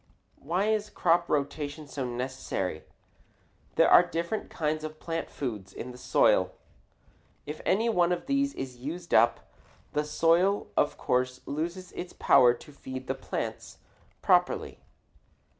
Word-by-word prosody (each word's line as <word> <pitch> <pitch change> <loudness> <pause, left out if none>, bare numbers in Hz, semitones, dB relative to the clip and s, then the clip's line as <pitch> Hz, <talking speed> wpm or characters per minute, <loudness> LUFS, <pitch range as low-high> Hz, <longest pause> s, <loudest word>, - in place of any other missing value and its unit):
Why 175 +7 0
is 210 -1 0
crop 175 -3 +2
rotation 145 +1 -2
so 135 -1 -4
necessary? 120 -9 -3 0.9
There - - +5
are - - +9
different 170 +6 -3
kinds 155 0 -2
of 155 0 -7
plant 165 0 -4
food 105 -9 -5
in 125 - -6
the 125 - -11
soil. - - +3 0.9
If 150 +1 -6
any 220 +4 +3
one 180 -6 +3
of 175 +5 -1
these 280 0 +1
is 130 -2 -6
used 165 +7 -6
up, 115 +2 +3 0.4
the 150 - +1
soil 170 +6 +2
of 145 - +2
course 125 0 0
loses 170 +5 -4
its 175 - -7
power 125 -3 +6
to 150 - -14
feed 130 -2 -7 0.2
plants - - -5 0.5
properly. - - +2
150 Hz, 135 wpm, -28 LUFS, 130-175 Hz, 0.9 s, are